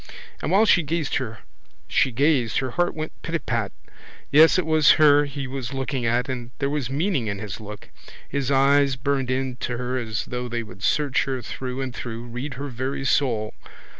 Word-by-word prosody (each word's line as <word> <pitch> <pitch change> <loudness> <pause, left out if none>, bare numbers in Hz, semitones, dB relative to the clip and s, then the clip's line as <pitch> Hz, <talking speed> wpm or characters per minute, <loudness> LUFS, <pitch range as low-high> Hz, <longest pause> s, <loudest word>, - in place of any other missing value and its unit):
And - - -2
while 205 +4 +5
she 180 - +5
gazed 155 -1 -2
her 115 -4 -4 1.3
heart 175 +6 0
went 155 0 -6
pitapat. 120 - -2 0.6
Yes, 160 +4 +7
it 185 - +1
was 155 -1 +5
her 145 -1 +5
he 140 -1 -5
was 130 0 -5
looking 135 -2 -2
at, 120 +2 +1
and 125 -2 -5
there 140 -1 -1
was 145 -5 -2
meaning 145 - 0
in 100 -1 -2
his 100 -1 -6
look. 105 -1 -10 0.4
His 140 -1 -2
eyes 140 0 +4
burned 135 0 -1
into 130 -1 -2
her 125 +1 -2
as 110 -4 -3
though 125 -1 -4
they 120 0 -2
would 95 -3 -13
search 145 +2 +1
her 130 -2 -3
through 130 +1 -5
and 130 -2 -4
through, 115 -1 -6
read 125 +3 -6
her 140 +2 -5
very 130 +2 -3
soul. 115 -6 +1
130 Hz, 175 wpm, -24 LUFS, 120-145 Hz, 1.3 s, Yes